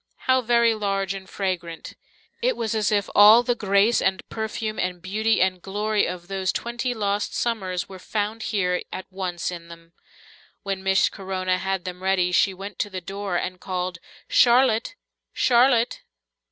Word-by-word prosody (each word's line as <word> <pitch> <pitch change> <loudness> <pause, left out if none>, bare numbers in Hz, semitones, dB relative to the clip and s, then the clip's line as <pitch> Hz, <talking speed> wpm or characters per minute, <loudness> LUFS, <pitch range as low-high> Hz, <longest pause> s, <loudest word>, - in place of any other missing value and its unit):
How 260 0 +4
very 235 -1 +3
large 195 -2 -1
and 190 -1 -9
fragrant! 175 -4 -4 0.5
It - - +1
was 225 -2 -2
as 215 -2 +1
if 205 -1 +1
all 215 +4 +8
the 245 - +1
grace 205 +1 +2
and 190 0 -1
perfume 220 0 -4
and 180 0 -2
beauty 215 +5 0
and 185 -1 -1
glory 210 +3 0
of 175 -1 -6
those 190 -1 -1
twenty 240 +1 -3
lost 205 -1 -1
summers 190 -7 -2
were 190 -1 -10
found 215 +3 -3
here 180 -4 0
at 185 - -6
once 180 -2 -3
in 170 -1 -8
them. 165 0 -14 0.7
When 195 -2 -3
Miss 190 0 +3
Corona 185 -1 -2
had 190 -1 -2
them 180 0 -6
ready, 185 -1 +1
she 180 +2 +3
went 195 +1 -9
to 205 - -1
the 190 -2 -5
door 195 +1 -5
and 180 +1 -3
called, 180 -2 -3 0.3
"Charlotte! 240 - +4 0.4
Charlotte!" 240 -1 +3
195 Hz, 165 wpm, -24 LUFS, 185-220 Hz, 0.7 s, all